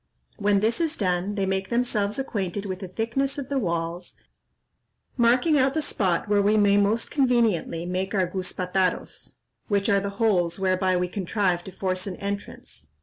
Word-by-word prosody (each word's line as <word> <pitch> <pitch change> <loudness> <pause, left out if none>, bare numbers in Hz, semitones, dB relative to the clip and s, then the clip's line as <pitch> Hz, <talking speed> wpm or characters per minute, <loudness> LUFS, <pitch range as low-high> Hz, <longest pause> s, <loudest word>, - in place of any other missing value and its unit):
When 205 -1 +2
this 225 +9 +1
is 325 -1 -1
done, 185 0 0
they 195 -2 0
make 190 0 -1
themselves 220 -4 0
acquainted 205 -7 -3
with 185 -2 -4
the 190 - -6
thickness 235 +9 -2
of 275 -2 -5
the 280 -1 0
walls, 170 -3 -3 1.0
marking 255 +6 +3
out 265 +2 +2
the 315 - +1
spot 185 -10 0
where 205 0 +3
we 210 +2 +3
may 205 -1 +4
most 205 +3 +1
conveniently 230 - +1
make 185 +3 -2
our 190 -2 +3
guzpataros, 185 0 -2 0.3
which 200 -1 +1
are 200 -1 +4
the 200 +1 -3
holes 180 -7 +2
whereby 185 -1 +1
we 180 0 0
contrive 185 -1 -1
to 190 - -8
force 185 0 -3
an 190 - -4
entrance. 200 +1 -7
200 Hz, 170 wpm, -25 LUFS, 185-225 Hz, 1.0 s, may